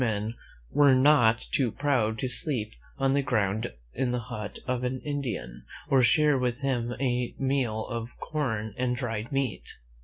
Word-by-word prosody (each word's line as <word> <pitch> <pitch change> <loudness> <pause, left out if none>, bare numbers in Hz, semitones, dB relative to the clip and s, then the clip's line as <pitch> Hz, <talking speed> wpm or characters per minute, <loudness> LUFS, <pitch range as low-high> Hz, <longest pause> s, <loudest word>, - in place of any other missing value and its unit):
^a - - +4
men 105 +1 -2 0.4
were 140 -2 +5
not 130 -5 +4
too 130 -5 +2
proud 125 -6 +1
to 130 - -2
sleep 120 -4 +1 0.3
on 135 0 +2
the 140 - +3
ground 110 -5 0 0.2
in 130 +1 0
the 125 - 0
hut 115 -4 -6
of 125 -1 -1
an 130 +1 -1
Indian, 135 - -4 0.3
or 135 -1 +5
share 145 +4 +4
with 125 +1 -1
him 125 -3 -1
a 125 -2 -1
meal 130 -5 0
of 115 -1 -4
corn 110 -9 -2
and 125 -1 +1
dried 115 -3 -3
meat. 135 -4 -2
125 Hz, 165 wpm, -28 LUFS, 110-135 Hz, 0.4 s, were